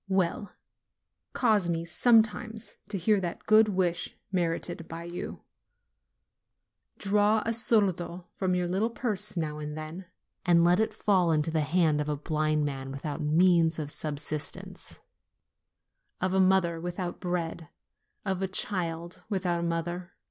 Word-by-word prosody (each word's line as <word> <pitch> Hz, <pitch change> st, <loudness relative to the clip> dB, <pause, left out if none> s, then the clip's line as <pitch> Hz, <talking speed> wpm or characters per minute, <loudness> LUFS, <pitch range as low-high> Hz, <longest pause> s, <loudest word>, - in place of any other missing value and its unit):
Well, 190 Hz, +1 st, 0 dB, 0.8 s
cause 215 Hz, -7 st, +2 dB
me 165 Hz, 0 st, -1 dB
sometimes 220 Hz, +4 st, +2 dB
to 200 Hz, -, -2 dB
hear 195 Hz, +3 st, +2 dB
that 175 Hz, -2 st, -5 dB
good 215 Hz, 0 st, +6 dB
wish 180 Hz, -3 st, -1 dB
merited 170 Hz, -2 st, -2 dB
by 165 Hz, +1 st, -7 dB
you; 175 Hz, +1 st, -6 dB, 1.5 s
draw 210 Hz, +2 st, +2 dB
a 230 Hz, -, 0 dB
soldo 185 Hz, -6 st, +3 dB
from 185 Hz, -2 st, 0 dB
your 180 Hz, -1 st, 0 dB
little 195 Hz, +6 st, 0 dB
purse 225 Hz, -6 st, -2 dB
now 150 Hz, -2 st, -2 dB
and 150 Hz, 0 st, -5 dB
then, 155 Hz, +4 st, -7 dB, 0.4 s
and 170 Hz, -2 st, +4 dB
let 175 Hz, +2 st, +4 dB
it 220 Hz, -, +1 dB
fall 195 Hz, -5 st, +2 dB
into 155 Hz, 0 st, +1 dB
the 160 Hz, -1 st, +1 dB
hand 155 Hz, 0 st, +2 dB
of 150 Hz, -, -3 dB
a 150 Hz, -, -1 dB
blind 155 Hz, 0 st, 0 dB
man 135 Hz, -2 st, -4 dB
without 145 Hz, +3 st, -5 dB
means 165 Hz, +2 st, +3 dB
of 150 Hz, -2 st, -3 dB
subsistence, 150 Hz, 0 st, -4 dB, 1.2 s
of 185 Hz, 0 st, 0 dB
a 190 Hz, -, +3 dB
mother 185 Hz, -3 st, +3 dB
without 175 Hz, 0 st, -4 dB
bread, 170 Hz, -3 st, -3 dB, 0.6 s
of 190 Hz, -2 st, -1 dB
a 190 Hz, -, 0 dB
child 175 Hz, -2 st, -2 dB
without 180 Hz, -4 st, 0 dB
a 170 Hz, -, -1 dB
mother. 175 Hz, +2 st, -3 dB
175 Hz, 140 wpm, -28 LUFS, 165-190 Hz, 1.5 s, good